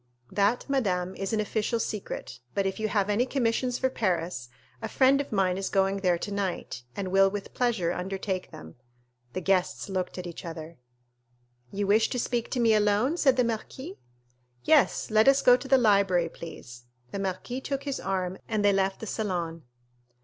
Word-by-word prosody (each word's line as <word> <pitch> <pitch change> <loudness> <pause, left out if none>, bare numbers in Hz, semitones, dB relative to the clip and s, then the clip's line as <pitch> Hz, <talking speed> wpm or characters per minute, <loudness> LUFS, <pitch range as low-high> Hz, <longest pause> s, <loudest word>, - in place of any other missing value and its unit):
"That, 205 +5 +1
madame, 190 -10 0
is 195 - -3
an 220 - +1
official 215 +2 -1
secret; 200 - -5 0.2
but 200 - +1
if 195 +3 -2
you 220 - 0
have 200 -2 +1
any 215 +5 +1
commissions 250 -1 0
for 260 -1 0
Paris, 175 - -1 0.3
a - - -4
friend 270 +1 +4
of 285 - -8
mine 190 -3 +1
is 195 - -2
going 195 0 +2
there 180 -3 +2
tonight, 195 -9 -3
and 195 -2 -3
will 195 +1 +5
with 200 0 -6
pleasure 225 -9 +1
undertake 190 +1 -3
them." 80 +5 -12 0.6
The 185 - -3
guests 185 +1 0
looked 185 -1 -3
at 180 - -5
each 170 -2 -7
other. 165 -2 -8 0.9
"You 200 +1 -1
wish 215 +3 +3
to - - -2
speak 240 -1 -1
to 255 - -2
me 230 -2 +4
alone?" 210 +7 +2
said 270 -7 +3
the 250 - +4
marquis. 230 - -5 0.6
"Yes, 300 -5 +3
let 215 +2 +5
us 275 0 +5
go 245 - +8
to 265 - -6
the 270 - +5
library, 195 -7 +3
please." 120 -8 -10 0.3
The 200 - -4
marquis 195 +7 -3
took 275 0 -3
his 280 -2 -3
arm, 185 -1 -2
and 215 -2 0
they 200 - +5
left 195 0 0
the - - -4
salon. 175 -7 -3
200 Hz, 185 wpm, -27 LUFS, 185-235 Hz, 0.9 s, go